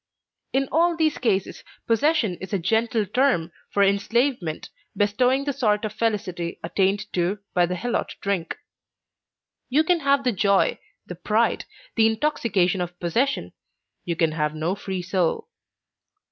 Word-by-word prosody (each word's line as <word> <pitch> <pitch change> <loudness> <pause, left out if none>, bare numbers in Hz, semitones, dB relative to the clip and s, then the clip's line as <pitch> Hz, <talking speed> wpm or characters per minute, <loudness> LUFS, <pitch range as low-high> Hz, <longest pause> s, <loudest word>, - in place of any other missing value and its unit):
In 270 0 +1
all 335 +2 +3
these 315 -2 +1
cases 200 -6 -1 0.2
possession 235 - +2
is 190 - -8
a - - +3
gentle 220 +4 +1
term 210 -6 +1 0.2
for 200 - +2
enslavement, 200 - 0 0.3
bestowing 250 +7 +2
the 285 - -1
sort 215 -5 +1
of 215 - -4
felicity 200 -7 -2
attained 195 +4 +1
to 180 +3 0 0.2
by 175 -1 +3
the 180 - -2
helot 235 +6 -2
drunk. 195 -4 -2 1.1
You 290 +5 +3
can 350 +1 +2
have 280 -2 +2
the 250 - +2
joy, 200 -1 +2 0.3
the - - -7
pride, 215 +6 0 0.3
the 220 -1 +5
intoxication 220 - +1
of 175 0 -5
possession; 235 +11 0 0.5
you 170 - -2
can 165 -1 +2
have 150 -1 -1
no 160 +4 -1
free 190 -2 -4
soul. 185 - -1
205 Hz, 145 wpm, -24 LUFS, 180-250 Hz, 1.1 s, the